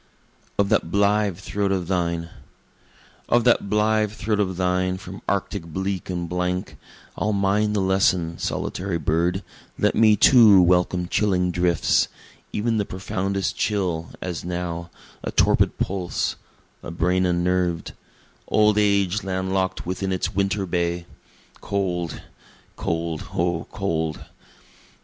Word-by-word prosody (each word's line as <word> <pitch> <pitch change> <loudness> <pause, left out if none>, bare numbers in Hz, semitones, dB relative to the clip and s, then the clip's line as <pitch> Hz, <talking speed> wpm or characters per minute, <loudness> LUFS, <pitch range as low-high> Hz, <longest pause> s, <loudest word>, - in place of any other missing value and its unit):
Of 100 -1 +2
That 105 -6 +2
Blithe 100 0 +2
Throat 100 +1 -2
of 95 -3 -1
Thine 85 -2 -1 1.0
Of 120 0 +4
that 120 -4 +3
blithe 105 0 +2
throat 105 0 -2
of 95 -3 0
thine 90 0 0
from 95 0 -9
arctic 100 -1 -1
bleak 95 +3 -4
and 90 -1 -3
blank, 90 +1 -2 0.4
I'll 105 - 0
mind 100 +2 +1
the 100 - +1
lesson, 95 -3 +1
solitary 95 -2 -2
bird 85 +5 0 0.3
let - - +2
me 110 -2 +5
too 110 -3 +7
welcome 90 0 +3
chilling 90 -3 +1
drifts, 85 0 +2 0.4
E'en 115 +1 0
the 105 - +1
profoundest 95 0 -2
chill, 90 -6 -1
as 90 -3 -4
now 85 -1 -4 0.3
a - - -4
torpid - - +3
pulse, 95 -2 -2 0.5
a - - -7
brain 90 +2 +1
unnerv'd, 90 -1 0 0.5
Old 105 -1 +3
age 100 -1 +2
land 95 0 -2
lock'd 95 -1 0
within 95 +2 -3
its 95 - -1
winter 100 +1 0
bay 85 -1 -1 0.6
(cold, 90 -4 -2 0.5
cold, 85 -1 -3
O 85 -1 0
cold!) 80 -5 -2
95 Hz, 125 wpm, -23 LUFS, 85-100 Hz, 1.0 s, too